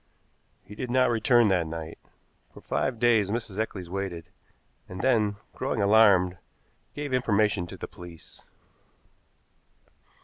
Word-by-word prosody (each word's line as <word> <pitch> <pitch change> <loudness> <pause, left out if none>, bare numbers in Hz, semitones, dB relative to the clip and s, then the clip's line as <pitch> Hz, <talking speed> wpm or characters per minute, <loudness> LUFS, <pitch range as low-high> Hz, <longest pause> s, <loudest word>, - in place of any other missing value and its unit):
He - - -13
did 125 +4 -5
not 125 0 +3
return 120 -1 +3
that 90 -4 +1
night. 80 0 -7 0.5
For - - -14
five 130 -3 -2
days 110 -4 +3
Mrs. 110 -2 -4
Eccles 100 -5 -3
waited, 90 -2 -5 0.6
and 95 0 -6
then, 110 -6 +2 0.2
growing - - -3
alarmed, 100 -4 +4 0.6
gave 145 -2 -4
information 105 -6 +1
to - - -10
the - - -7
police. 85 -2 -13
105 Hz, 125 wpm, -27 LUFS, 90-120 Hz, 0.6 s, alarmed